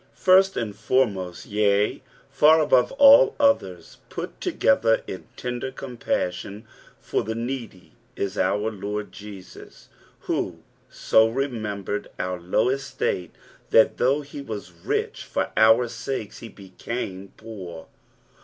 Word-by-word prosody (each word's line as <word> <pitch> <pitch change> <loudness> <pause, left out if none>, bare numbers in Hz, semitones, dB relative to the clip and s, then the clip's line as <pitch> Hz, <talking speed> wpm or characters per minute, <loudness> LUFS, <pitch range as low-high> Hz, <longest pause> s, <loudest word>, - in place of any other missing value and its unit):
Firet 190 +1 +4
and 105 -3 -3
foremost, 100 -8 -1
yea, 105 0 +1 0.3
fur 155 +1 +5
tibavc 130 -4 +4
hU 280 0 +8
others 95 - 0
put - - -7
together 115 0 +2
in 95 - -8
tender 125 +1 -4
compusLon 105 -6 -4 0.4
for - - -2
Ibe 110 +2 -4
needy 115 -6 -6 0.3
U 100 - 0
our 105 +2 +1
Lord 105 0 -5
Jesus, 100 -3 -12 0.3
who - - -3 0.3
so 110 0 +3
rememberud 110 -6 -3
our 90 0 -3
low 90 +7 +1
estate, 135 -9 -2 0.3
that 110 - +4
thongb 140 +4 +1
he 140 0 -8
was 110 -8 -7
rich, 85 -1 -3
for - - -2
our 110 +2 +5
sakei 115 -2 -5
he 115 - -9
bccume 95 0 -7
poor. 90 -7 -9
110 Hz, 120 wpm, -24 LUFS, 100-130 Hz, 0.4 s, hU